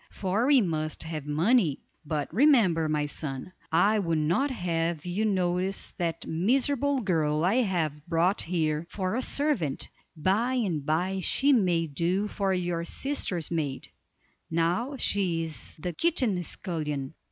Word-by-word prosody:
For 200 +6 -1
we 280 -3 +6
must 155 -5 -2
have 155 -3 -6
money; 165 - +2 0.3
but 150 -1 -3
remember, 205 - +4
my 150 -1 0
son, 145 +3 -5 0.2
I 210 +6 +4
would 165 -4 0
not 170 - +1
have 170 - -2
you 185 +5 -1
notice 185 -1 0
that 170 -2 -2
miserable 270 - +1
girl 160 -5 +1
I 200 +7 +2
have 165 - -1
brought 175 +4 +2
here 160 -2 -1
for 190 +1 -2
a 255 - 0
servant; 265 - 0 0.3
by 210 +11 +1
and 185 - -1
by 180 +6 0
she 275 +9 +3
may 180 -8 +2
do 170 +7 -1
for 200 -2 -1
your 175 -2 -1
sister's 180 - -2
maid; 145 -5 -3 0.6
now 175 - 0
she 180 -8 +1
is 160 -1 -3
the 175 +3 -4
kitchen 250 - +1
scullion." 150 -6 -3
175 Hz, 140 wpm, -27 LUFS, 160-210 Hz, 0.6 s, we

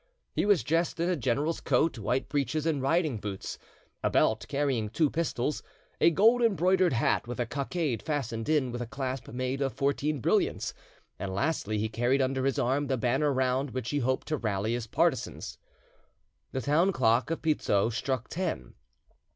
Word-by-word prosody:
He - - 0
was 205 -6 +4
dressed 165 +2 0
in 170 +2 +1
a - - +2
general's 145 +4 -1
coat, 135 0 +1
white 115 +5 -1
breeches 145 +2 -1
and 155 -4 +1
riding 155 -2 +1
boots, 100 -2 -5 0.4
a - - +3
belt 110 0 +2
carrying 135 -7 0
two 150 +6 +1
pistols, 150 -4 -1 0.4
a - - +6
gold 225 +8 +4
embroidered 185 - +3
hat 120 0 +1
with 120 0 -5
a 120 - +1
cockade 140 0 -2
fastened 125 -6 -3
in 145 -5 +2
with 120 0 -4
a 120 - -4
clasp 130 -1 -4
made 130 +3 -3
of 135 -2 0
fourteen 140 +1 0
brilliants, - - +1 0.5
and 95 -1 -4
lastly 110 -4 0
he 110 +1 0
carried 120 +5 +1
under 130 0 0
his 135 - +1
arm 135 +4 +1
the 130 -1 0
banner 130 +5 +1
round 130 +1 +1
which 125 -2 -3
he 145 - +1
hoped 130 0 0
to 155 - 0
rally 105 -2 -1
his 120 -2 -3
partisans. 140 -1 -1 0.9
The 130 - -2
town 160 +8 +3
clock 120 -2 +2
of 165 - -3
Pizzo 115 -9 +2
struck 125 +2 -2
ten. 165 - -3
135 Hz, 175 wpm, -29 LUFS, 120-155 Hz, 0.9 s, a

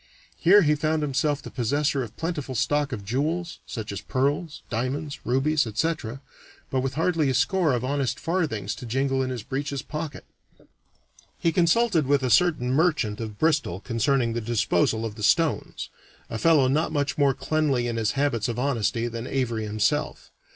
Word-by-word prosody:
Here 200 +4 +6
he 150 -1 +4
found 155 +1 0
himself 145 +1 0
the - - -8
possessor 140 +3 0
of 120 - -4
a - - -29
plentiful 150 -6 -4
stock 145 +4 +1
of 105 -6 -5
jewels, 155 - -2
such 110 -4 -5
as 100 - -5
pearls, 145 +5 -1
diamonds, 130 +5 -3
rubies, 135 +3 +2
etc., 135 +1 -2 0.5
but 130 - +1
with 135 +1 -3
hardly 160 -2 +1
a 130 - 0
score 155 +5 +2
of 120 0 -1
honest 140 -1 -1
farthings 150 - -1
to 125 - -8
jingle 135 +2 0
in 130 - -1
his 125 -4 -4
breeches 140 +2 -3
pocket. 155 -2 -6 1.1
He 165 - +1
consulted 170 - +3
with 140 -1 +2
a 125 - 0
certain 140 -2 +3
merchant 145 -9 +1
of 110 -2 -6
Bristol 150 - +1
concerning 115 +2 0
the 120 - -2
disposal 115 -1 +1
of 110 - -4
the 105 - -10
stones 160 +8 +1 0.4
a 115 - -3
fellow 155 -4 +4
not 155 +5 +1
much 145 -1 -1
more 140 -2 +4
cleanly 150 -6 0
in 120 -1 -2
his 110 -1 0
habits 135 -5 0
of 120 -1 -3
honesty 120 -3 0
than 115 0 -5
Avary 120 -5 -1
himself. 110 +8 -1
135 Hz, 175 wpm, -25 LUFS, 115-155 Hz, 1.1 s, Here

